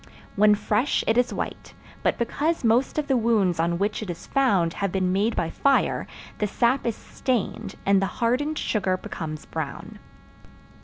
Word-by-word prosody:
When 210 +1 +5
fresh 210 +5 +1
it 225 - +2
is 245 0 +2
white, - - -5 0.3
but - - +1
because 295 +7 -1
most 235 +6 +2
of 305 - 0
the 270 -2 +1
wounds 215 -8 +2
on 170 +1 +1
which 205 +4 -1
it 215 - -6
is 170 - -6
found 200 -12 +2
have 200 -2 -2
been 185 -1 0
made 205 +5 +1
by 165 - -1
fire 275 -1 +1 0.3
the 210 - +1
sap 240 +5 +1
is 230 - 0
stained 225 -4 -3
and 195 -1 +4
the 195 - +1
hardened 265 +6 0
sugar 190 -4 0
becomes 155 -4 -6
brown. 155 -4 -6
210 Hz, 170 wpm, -25 LUFS, 185-245 Hz, 0.3 s, When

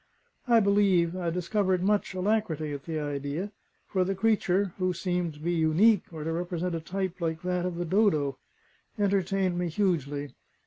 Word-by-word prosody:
I 235 -1 +6
believe 195 -4 +3
I 175 -2 -1
discovered 185 +1 0
much 205 -1 +1
alacrity 185 -6 0
at 140 -1 -7
the 160 -2 -3
idea, 145 +6 -3 0.3
for 190 -2 0
the 195 +2 -1
creature 200 -3 +1
(who 185 0 +1
seemed 175 -2 -2
to - - -14
be 170 +3 -1
unique, 170 +6 +4
or 160 -2 -6
to 165 +1 -2
represent 175 +1 -2
a 165 - -1
type 185 +1 -4
like 160 0 -2
that 180 0 0
of 180 - -4
the 175 +1 -2
dodo) 155 -8 +2 0.6
entertained 195 -2 +1
me 175 -1 -1
hugely. 145 -7 -1
180 Hz, 170 wpm, -28 LUFS, 160-195 Hz, 0.6 s, I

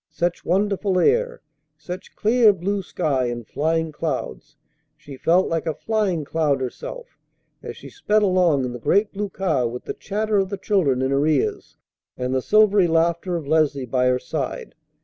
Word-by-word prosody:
Such 175 0 -2
wonderful 195 +1 0
air, - - +2 0.4
such 180 +4 -9
clear 220 -1 +4
blue 195 +2 -2
sky 145 -8 -1
and 120 -1 -5
flying 160 +4 -1
clouds! 150 -1 -5 0.4
She 140 -2 -11
felt 175 +7 +2
like 165 -1 -2
a 160 - -1
flying 200 -8 -1
cloud 150 -3 0
herself 130 - -7 0.4
as - - -8
she - - -11
sped 215 - +1
along 180 -8 +3
in 125 - -4
the 120 - -7
great 205 - +1
blue 205 0 -3
car 165 -11 0
with 125 +2 -6
the - - -5
chatter 210 +1 -1
of 190 -1 0
the 200 - -4
children 145 -13 +1
in 130 - 0
her 140 +2 +2
ears 150 -4 -1 0.4
and 125 +1 -2
the 130 - +1
silvery 205 +1 +4
laughter 170 +2 +1
of 160 -4 -4
Leslie 150 -3 +1
by 125 +1 +1
her 125 0 +3
side. 130 +1 -5
165 Hz, 175 wpm, -22 LUFS, 140-200 Hz, 0.4 s, clear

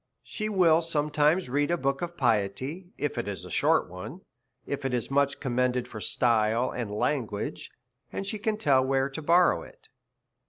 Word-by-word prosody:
She 215 0 -4
will 170 -5 +4
sometimes 150 +1 +1
read 145 +3 0
a 175 - +1
book 135 -2 -1
of 175 0 -5
piety, 130 - -1
if 145 -4 -2
it 120 - -3
is 100 -2 -5
a - - -10
short - - +2
one, 110 - -9 0.4
if 140 0 -4
it 135 -2 0
is 120 +1 -3
much 140 0 +1
commended 125 -2 0
for 110 -3 -8
style 115 +1 +2
and 120 -4 -4
lan 115 +4 0
guage, 100 -1 -5 0.4
and 195 - -4
she 210 +2 -4
can 215 +1 -1
tell 135 -9 +3
where 135 +1 +1
to 160 - -6
borrow 170 +3 +4
it. - - -15
140 Hz, 185 wpm, -27 LUFS, 120-165 Hz, 0.4 s, will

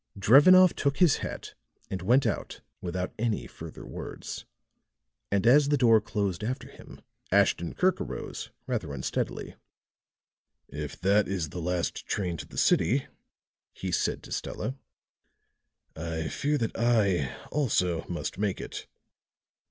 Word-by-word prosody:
Drevenoff 165 - +7
took 140 -1 0
his 175 -6 +5
hat - - -6 0.4
and 95 - -3
went 125 +8 +4
out 105 - -3 0.2
without 90 +1 -3
any 115 -2 0
further - - -10
words. - - -7 0.8
And 100 +1 +1
as 140 +4 +6
the 145 - +3
door 115 -4 +5
closed 100 -3 -2
after 125 +4 -3
him, - - -14 0.3
Ashton 85 - +2
Kirk 185 0 +2
arose, 60 -2 -5 0.2
rather 75 - -3
unsteadily. 65 - -3 1.1
"If 75 -2 -6
that 100 +2 +3
is 90 -5 -2
the 90 - -6
last 90 +1 -2
train 90 -4 -1
to - - -8
the - - -12
city," - - +3 0.7
he 95 - -5
said - - 0
to - - -12
Stella, 130 - -3 1.2
"I 80 -1 -3
fear 150 +1 0
that 115 -5 -2
I, 100 - +2 0.2
also, 90 - +1
must 90 +2 -4
make 100 -2 0
it." - - -7
100 Hz, 135 wpm, -28 LUFS, 85-125 Hz, 1.2 s, Drevenoff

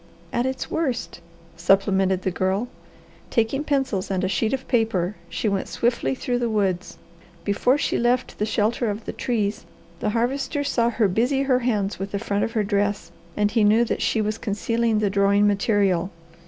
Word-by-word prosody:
"At 240 +2 +1
its 260 0 -4
worst," 255 - -2 0.3
supplemented 190 +1 +2
the 190 - 0
Girl. 190 +6 0 0.6
Taking 240 +5 +1
pencils 270 -10 -1
and 190 -1 -1
a - - +2
sheet 200 +4 0
of 265 -1 -3
paper 210 -6 +1
she - - -2
went 200 -2 0
swiftly 235 - 0
through 245 - -1
the 240 -1 0
woods. 195 -4 -1 0.5
Before 230 +6 +2
she - - 0
left 245 +1 0
the 210 - +1
shelter 220 +2 0
of 210 +2 -4
the - - -4
trees, 215 -6 -1 0.4
the 210 - 0
Harvester 265 +6 -1
saw 235 -4 +1
her 225 -2 +2
busy 245 +8 +1
her 260 -2 +2
hands 210 -6 -1
with 195 +1 -5
the - - +1
front 200 +1 -1
of 230 - -2
her 220 -3 +1
dress, 205 -3 -1 0.3
and 210 0 +2
he 225 -1 +2
knew 220 +3 +5
that - - -2
she 220 - +1
was 215 +1 -2
concealing 225 +2 0
the 210 -2 +1
drawing 200 +1 +3
material. 200 -3 +2
215 Hz, 180 wpm, -23 LUFS, 200-240 Hz, 0.6 s, knew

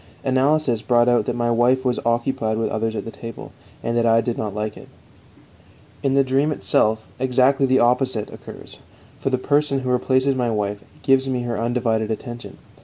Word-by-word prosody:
Analysis 130 -2 +1
brought 120 0 +3
out 120 -1 +3
that 120 - -2
my 120 0 0
wife 125 +3 +2
was 125 -1 +1
occupied 115 -1 0
with 115 - -1
others 110 +1 -2
at 115 - -5
table, 115 -1 -9 0.3
and 115 - -1
that 120 0 +2
I 115 0 +5
did 115 +1 -1
not 105 -2 -4
like 105 0 -3
it; - - -12 1.1
in 135 -1 +1
the 140 - +5
dream 135 +3 +1
itself 110 -1 +1
exactly 130 +2 +3
the 130 0 +3
opposite 125 -2 +1
occurs, - - -11 0.4
for - - -1
the 130 - +1
person 145 +1 +1
who 130 -1 -2
replaces 130 +2 +2
my 125 -2 0
wife 105 -2 -2 0.2
gives 135 0 +3
me 125 -2 -1
her 120 -1 -3
undivided 115 -2 0
attention. 120 +2 -6
120 Hz, 180 wpm, -22 LUFS, 115-130 Hz, 1.1 s, I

